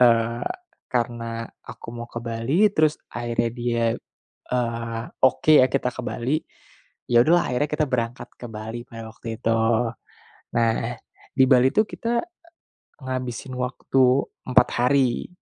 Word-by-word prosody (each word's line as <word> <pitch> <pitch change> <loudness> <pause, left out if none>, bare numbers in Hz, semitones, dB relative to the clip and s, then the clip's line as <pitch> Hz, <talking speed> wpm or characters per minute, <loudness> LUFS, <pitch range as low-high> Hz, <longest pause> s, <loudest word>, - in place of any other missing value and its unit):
eee, 115 -1 +4 0.4
karena 115 -1 -2 0.2
aku - - -11
mau 120 0 -7
ke 120 - -6
Bali, 130 - +2
terus 155 -4 +3 0.2
akhirnya 120 -1 -1
dia, 120 -1 -1 0.7
eee, 115 -2 -2 0.2
oke 130 +4 +3
ya 130 - +6
kita 125 -2 0
ke - - -6
Bali, 125 +5 -1 0.7
ya 120 -1 +5
udahlah 175 +2 +3
akhirnya 145 +4 +1
kita 150 0 +1
berangkat 120 -1 -2
ke 120 - -8
Bali 110 +2 -6
pada 115 -1 -8
waktu 115 0 -7
itu. 115 - +1 1.1
Nah, 115 -1 +3 0.6
di 130 - +6
Bali 130 0 +6
tuh 215 - +4
kita, 235 +1 -1 0.8
e - - -26
ngabisin 130 0 -4
waktu 125 +1 +1 0.4
4 130 - +5
hari, 125 0 +2
120 Hz, 135 wpm, -24 LUFS, 115-130 Hz, 1.1 s, ya